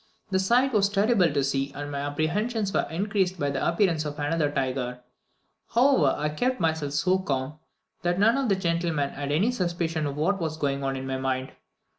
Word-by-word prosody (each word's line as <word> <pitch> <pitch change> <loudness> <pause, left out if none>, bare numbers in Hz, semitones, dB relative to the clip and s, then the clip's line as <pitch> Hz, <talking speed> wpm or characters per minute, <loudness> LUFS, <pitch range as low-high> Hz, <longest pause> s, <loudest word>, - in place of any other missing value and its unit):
The 190 - +2
sight 245 +7 +3
was 200 -2 +3
terrible 200 -4 +3
to 140 -1 +1
see, 135 0 -1
and 145 0 -5
my 140 - -3
apprehensions 195 +9 -1
were - - +1
increased 190 +2 0
by 145 0 0
the 135 - -2
appearance 170 -3 +2
of 150 0 -5
another 150 0 0
tiger; 130 -3 -2 0.7
however, 240 - +4
I 150 +1 -1
kept 250 +11 -1
myself 160 -4 0
so 185 +5 +2
calm, 140 -3 -3 0.4
that 175 0 0
none 220 +5 +4
of 270 -3 0
the 195 - +4
gentlemen 170 -5 -1
had 145 0 -4
any 195 +11 +2
suspicion 170 -7 -1
of 140 0 -5
what 195 +5 +1
was 160 -1 -2
going 140 -2 -1
on 135 0 -1
in 130 0 -5
my 135 0 -2
mind. 130 0 -2
160 Hz, 195 wpm, -26 LUFS, 140-195 Hz, 0.7 s, however